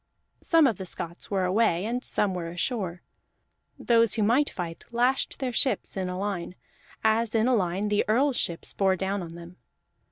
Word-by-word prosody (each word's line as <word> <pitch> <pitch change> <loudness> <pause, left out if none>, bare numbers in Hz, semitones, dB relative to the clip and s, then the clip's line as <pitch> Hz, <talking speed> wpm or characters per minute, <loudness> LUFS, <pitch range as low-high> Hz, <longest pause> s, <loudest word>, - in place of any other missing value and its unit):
Some 330 -2 +4
of 230 -8 +1
the 190 - -5
Scots 170 0 -5
were 195 -2 0
away, 185 -1 +2
and 245 +3 -2
some 200 -2 +1
were 170 -2 -4
ashore; 180 -1 -3 0.7
those 230 -2 +3
who 220 - +1
might 250 +8 +3
fight 170 -2 -6
lashed 245 +3 +1
their 260 -3 -3
ships 260 -1 +1
in 185 -2 -2
a 180 - -4
line, 190 -3 -3 0.5
as 220 +1 +2
in 225 +1 +3
a 255 - +3
line 195 -1 0
the 205 0 +2
Earl's 260 +5 +2
ships 170 -1 -2
bore 190 -1 +2
down 195 +2 -2
on 165 -1 -8
them. 170 +1 -11
205 Hz, 185 wpm, -27 LUFS, 180-235 Hz, 0.7 s, Some